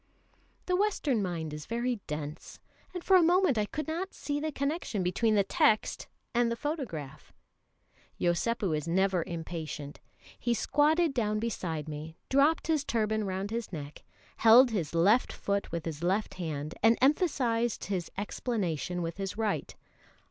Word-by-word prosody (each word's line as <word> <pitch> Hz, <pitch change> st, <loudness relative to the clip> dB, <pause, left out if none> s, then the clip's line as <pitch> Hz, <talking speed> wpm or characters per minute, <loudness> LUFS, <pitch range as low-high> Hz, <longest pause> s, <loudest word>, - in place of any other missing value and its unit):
The 365 Hz, -, +1 dB
Western 360 Hz, -, +1 dB
mind 165 Hz, -5 st, -3 dB
is 150 Hz, -1 st, -7 dB
very 240 Hz, +1 st, -1 dB
dense; 150 Hz, +1 st, -6 dB, 0.3 s
and 360 Hz, -2 st, -6 dB
for 385 Hz, -, +5 dB
a -, -, +6 dB
moment 350 Hz, -3 st, +4 dB
I 210 Hz, -, 0 dB
could 305 Hz, +7 st, -4 dB
not 345 Hz, +4 st, -3 dB
see 290 Hz, 0 st, -3 dB
the 310 Hz, +1 st, -2 dB
connection 280 Hz, -, -2 dB
between 215 Hz, +5 st, +2 dB
the 200 Hz, -, +4 dB
text 285 Hz, -, +2 dB, 0.3 s
and 240 Hz, -1 st, +2 dB
the -, -, 0 dB
photograph. 235 Hz, -, -5 dB, 0.9 s
Yosépu 180 Hz, +1 st, +1 dB
is 150 Hz, +1 st, -3 dB
never 185 Hz, 0 st, +2 dB
impatient. 160 Hz, -3 st, -6 dB, 0.4 s
He 240 Hz, 0 st, +1 dB
squatted 305 Hz, +5 st, +2 dB
down 215 Hz, -4 st, 0 dB
beside 180 Hz, -9 st, -3 dB
me, 155 Hz, +1 st, -7 dB
dropped 285 Hz, +4 st, +3 dB
his 310 Hz, -3 st, +1 dB
turban 220 Hz, -4 st, 0 dB
round 190 Hz, +2 st, -3 dB
his 230 Hz, -2 st, -3 dB
neck, 150 Hz, -3 st, -7 dB, 0.3 s
held 240 Hz, +3 st, +7 dB
his 170 Hz, -7 st, -2 dB
left 200 Hz, +9 st, +4 dB
foot 200 Hz, 0 st, -2 dB
with 170 Hz, -1 st, -3 dB
his 160 Hz, -2 st, -5 dB
left 190 Hz, +5 st, 0 dB
hand, 155 Hz, -4 st, -4 dB
and 225 Hz, +1 st, +5 dB
emphasised 255 Hz, -, +2 dB
his 185 Hz, -4 st, -3 dB
explanation 180 Hz, -, -2 dB
with 165 Hz, +1 st, -4 dB
his 195 Hz, 0 st, -4 dB
right. 220 Hz, -2 st, -2 dB
215 Hz, 155 wpm, -30 LUFS, 170-265 Hz, 0.9 s, held